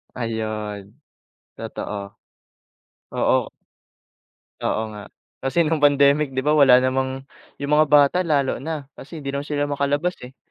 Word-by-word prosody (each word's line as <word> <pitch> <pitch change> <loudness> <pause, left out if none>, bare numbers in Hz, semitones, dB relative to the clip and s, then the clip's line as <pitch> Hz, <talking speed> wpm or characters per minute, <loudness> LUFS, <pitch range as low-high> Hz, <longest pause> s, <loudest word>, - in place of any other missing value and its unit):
Ayun, 110 -3 -4 0.6
totoo. 100 -1 -6 1.0
Oo. - - +1 1.1
Oo 110 - -1
nga, 105 -1 -10 0.3
kasi 160 +6 +1
nung 155 0 0
pandemic, 140 -1 +4
'di 130 - +1
ba, 150 - +3
wala 140 -4 +7
namang 130 +1 -1 0.3
yung 140 +1 -4
mga 155 +1 +5
bata, 145 +4 +5
lalo 140 -7 0
na, 155 -1 -4
kasi 155 +2 -9
'di 135 - -3
naman 140 +1 -4
sila 145 -1 -1
makalabas 145 +5 0
eh. 125 +2 -11
140 Hz, 130 wpm, -22 LUFS, 125-150 Hz, 1.1 s, wala